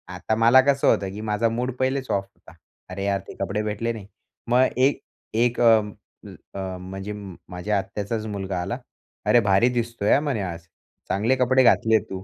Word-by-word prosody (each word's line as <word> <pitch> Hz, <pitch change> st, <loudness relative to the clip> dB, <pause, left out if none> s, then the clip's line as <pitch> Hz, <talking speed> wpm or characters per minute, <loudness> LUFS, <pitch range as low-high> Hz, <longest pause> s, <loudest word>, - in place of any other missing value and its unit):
आता 110 Hz, -, -1 dB
मला 115 Hz, +4 st, +6 dB
कसं 140 Hz, +1 st, +2 dB
होतं 95 Hz, -, +2 dB
की 105 Hz, -, -7 dB
माझा 110 Hz, +1 st, 0 dB
मूड 125 Hz, +3 st, -2 dB
पहिलेच 130 Hz, 0 st, -1 dB
ऑफ 100 Hz, -, +1 dB
होता. 95 Hz, -4 st, -20 dB, 0.4 s
अरे 100 Hz, +2 st, -4 dB
यार 100 Hz, -1 st, +1 dB
ते -, -, -8 dB
कपडे 100 Hz, +2 st, -1 dB
भेटले 110 Hz, +2 st, -2 dB
नाही. 105 Hz, -4 st, -9 dB, 0.4 s
मग 125 Hz, +2 st, +5 dB
एक 135 Hz, +2 st, +2 dB, 0.3 s
एक 120 Hz, +1 st, +1 dB
अ, 115 Hz, -2 st, +7 dB, 0.8 s
अ, -, -, -4 dB, 0.2 s
म्हणजे 95 Hz, +3 st, -6 dB, 0.4 s
माझ्या 95 Hz, +3 st, -2 dB
आत्याचाच 105 Hz, +3 st, -3 dB
मुलगा 95 Hz, -3 st, -3 dB
आला. 100 Hz, +7 st, -3 dB, 0.5 s
अरे, 120 Hz, -, +5 dB
भारी 100 Hz, +3 st, +3 dB
दिसतोय 115 Hz, -3 st, -1 dB
हां, 140 Hz, -, +4 dB
म्हणे 140 Hz, -8 st, -1 dB
आज. 85 Hz, -3 st, -5 dB, 0.5 s
चांगले 110 Hz, +7 st, +2 dB
कपडे 130 Hz, +1 st, +3 dB
घातले 110 Hz, -2 st, +4 dB
आहे -, -, +2 dB
तू. 95 Hz, 0 st, -6 dB
110 Hz, 180 wpm, -24 LUFS, 100-120 Hz, 0.8 s, अ